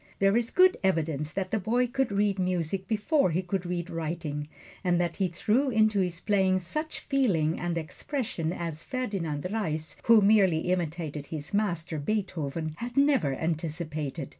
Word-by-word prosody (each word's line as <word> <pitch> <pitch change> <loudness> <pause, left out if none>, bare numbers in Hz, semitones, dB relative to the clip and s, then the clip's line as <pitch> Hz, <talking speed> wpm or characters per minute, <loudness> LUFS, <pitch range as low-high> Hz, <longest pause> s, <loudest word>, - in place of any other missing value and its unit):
There 195 +1 +3
is 235 0 +1
good 370 0 +5
evidence 160 -5 0
that 190 +1 -3
the 220 - +1
boy 240 +6 +1
could 250 -1 -1
read 200 -1 +1
music 185 0 -1
before 225 - +2
he 175 +3 0
could 185 0 -2
read 175 -1 -2
writing, 155 -3 -3 0.4
and 175 -2 +2
that 175 -1 -1
he 190 - +2
threw 220 +10 +1
into 215 -3 +3
his 180 -2 0
playing 190 -3 +2
such 305 - -4
feeling 190 - +1
and 175 0 -2
expression 170 - -3
as 165 -2 -4
Ferdinand 195 - -3
Reis, 160 -8 -2
who 230 -2 +7
merely 190 -5 +4
imitated 160 -4 -2
his 155 +1 -6
master, 175 -6 0
Beethoven, 160 -4 -2
had 240 +2 -6
never 275 - +3
anticipated. 155 -2 -3
180 Hz, 160 wpm, -28 LUFS, 160-215 Hz, 0.4 s, who